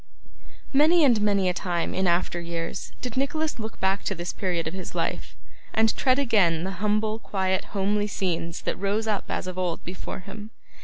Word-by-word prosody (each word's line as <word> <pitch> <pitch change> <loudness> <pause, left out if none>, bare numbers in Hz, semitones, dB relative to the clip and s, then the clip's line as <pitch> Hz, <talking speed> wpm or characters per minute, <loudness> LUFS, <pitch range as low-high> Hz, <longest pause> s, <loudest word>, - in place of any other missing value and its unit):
Many 315 +4 +6
and 235 -6 +4
many 200 -2 +3
a 180 - +2
time 175 -1 -1
in 190 0 +1
after 175 0 +1
years 170 -1 -4
did 250 -3 -3
Nicholas 300 +2 0
look 220 -1 -6
back 190 +1 +1
to 195 - 0
this 175 0 -4
period 180 -4 -1
of 160 - -4
his 185 -2 -6
life, - - -2 0.4
and 220 0 +4
tread 255 -1 +3
again 200 - +3
the 190 - -2
humble 215 +1 +1
quiet 190 -3 0
homely 205 +1 0
scenes 170 -4 -2
that - - -2
rose 200 +3 0
up 210 -3 0
as - - -2
of 185 0 -4
old 175 -2 -1
before 180 +2 -6
him. 205 +3 -9
195 Hz, 190 wpm, -26 LUFS, 180-220 Hz, 0.4 s, Many